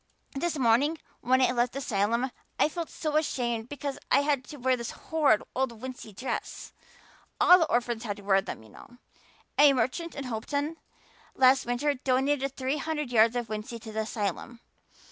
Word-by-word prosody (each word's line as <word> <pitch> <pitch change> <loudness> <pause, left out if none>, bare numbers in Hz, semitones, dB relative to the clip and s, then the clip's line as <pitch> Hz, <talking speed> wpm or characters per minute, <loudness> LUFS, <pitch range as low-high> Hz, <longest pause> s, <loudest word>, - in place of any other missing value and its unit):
This 320 +3 -2
morning 265 +6 +3 0.2
when 260 +2 +3
I 250 - +4
left 245 0 0
the - - -5
asylum 235 +1 0 0.3
I - - +3
felt 335 0 -5
so 305 -2 -1
ashamed 240 -6 -1
because 285 -1 -5
I 280 - +5
had 285 -2 +1
to 295 - -10
wear 260 0 +2
this 235 -2 -5
horrid 295 -10 +1
old 250 -4 -1
wincey 255 -3 -8
dress. 255 +7 -5 0.7
All 360 +1 +8
the 325 - +1
orphans 240 -1 0
had 205 -3 -4
to 205 - -12
wear 195 -1 +3
them, 110 - -7
you 110 - -16
know. 240 - -15 0.6
A 290 -1 +8
merchant 265 +7 -1
in 280 - -4
Hopeton 285 +6 -3 0.6
last 260 -1 +4
winter 245 +5 +1
donated 270 +1 0
three 265 +2 -1
hundred 300 -2 -3
yards 230 0 +5
of 240 -2 -2
wincey 215 +2 -5
to 220 - -8
the 220 - -3
asylum. 220 +1 -3
255 Hz, 180 wpm, -28 LUFS, 230-285 Hz, 0.7 s, All